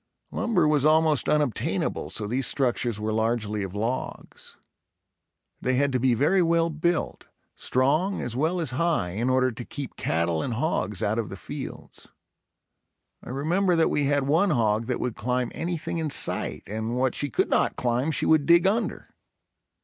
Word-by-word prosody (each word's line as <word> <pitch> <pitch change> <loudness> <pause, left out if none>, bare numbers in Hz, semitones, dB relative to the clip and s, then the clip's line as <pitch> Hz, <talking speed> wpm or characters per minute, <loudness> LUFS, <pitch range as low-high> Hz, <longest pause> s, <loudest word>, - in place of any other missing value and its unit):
Lumber 180 -10 +1
was 150 -2 +2
almost 155 -1 +3
unobtainable 150 -7 0
so 105 - -3
these 125 +6 -1
structures 120 -4 0
were 110 0 -2
largely 110 -1 -1
of 95 0 -5
logs. 115 +5 -4 1.1
They 130 0 0
had 140 +2 +2
to 130 - 0
be 125 -1 +2
very 150 - +3
well 165 0 +2
built, 165 +2 -2 0.3
strong 155 +10 +1
as 120 -1 -4
well 160 +7 0
as 160 -7 -2
high, 155 - 0
in 115 +7 -1
order 130 0 +2
to 120 +2 -8
keep 140 +2 -7
cattle 85 -1 0
and 120 - -3
hogs 110 - -1
out 110 +2 0
of 110 - -3
the 95 - -7
fields. - - -8 1.2
I - - -10
remember 170 +8 +1
that 165 - +2
we 145 - +1
had 145 0 +2
one 165 +8 +3
hog 115 -5 +1
that 125 - -2
would 125 -3 -3
climb 125 +1 -1
anything 170 -1 -3
in 160 -2 -2
sight - - 0
and 110 +3 -3
what 130 -1 +1
she 145 - -2
could - - 0
not - - +2
climb 125 +4 0
she 155 - 0
would 155 -3 +3
dig 170 +1 +6
under. 220 +4 0
130 Hz, 170 wpm, -25 LUFS, 115-160 Hz, 1.2 s, dig